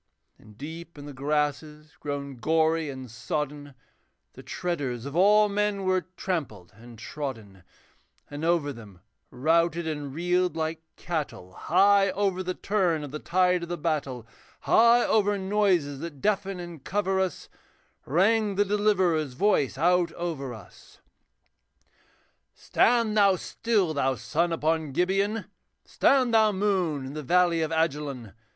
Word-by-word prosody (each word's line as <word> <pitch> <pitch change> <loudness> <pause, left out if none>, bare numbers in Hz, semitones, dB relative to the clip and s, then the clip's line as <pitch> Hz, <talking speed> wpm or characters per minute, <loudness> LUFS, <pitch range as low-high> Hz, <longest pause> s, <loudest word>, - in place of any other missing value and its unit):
And 105 -1 -18
deep 165 +4 -9
in 145 - -9
the 145 - -8
grasses 150 +2 -2
grown 140 -2 -5
gory 160 +3 +1
and 130 -2 -7
sodden, 145 +4 -4 0.6
The - - -11
treaders 140 -9 -4
of 140 +1 -6
all 210 +4 +5
men 205 -1 -1
were 185 -1 0
trampled 130 - -4
and 115 +1 -14
trodden; 110 -5 -7 0.7
And 145 +1 -7
over 165 -4 +1
them, 105 -6 -13 0.3
routed 165 +5 +1
and 145 -3 -4
reeled 180 +3 0
like 160 0 -3
cattle, 150 - -5
High 195 - +3
over 190 -1 -1
the 185 0 -3
turn 180 -7 0
of 145 - -7
the 150 - -5
tide 180 +1 +2
of 170 - -6
the 175 - -3
battle, 140 -7 -2 0.4
High 235 +1 +5
over 205 -1 +2
noises 190 -8 +1
that 160 -3 -7
deafen 195 0 -1
and 170 -5 -9
cover 195 -1 0
us, 190 -4 -2 0.6
Rang 205 - +2
the 205 +1 +2
Deliverer's 190 -8 +1
voice 140 - +1
out 175 +3 +2
over 160 -7 -4
us. 110 -3 -14 1.6
'Stand 230 -3 +2
thou 200 -2 +5
still, 200 -2 -1
thou 135 -2 0
sun 150 +10 -1
upon 160 -2 -1
Gibeon, 195 +6 0 0.4
Stand 255 -4 +2
thou, 220 -1 +5
moon, 185 -8 0
in 135 - -7
the 155 - -5
valley 175 +2 +2
of 160 - -1
Ajalon! 145 - -2
165 Hz, 140 wpm, -26 LUFS, 145-190 Hz, 1.6 s, all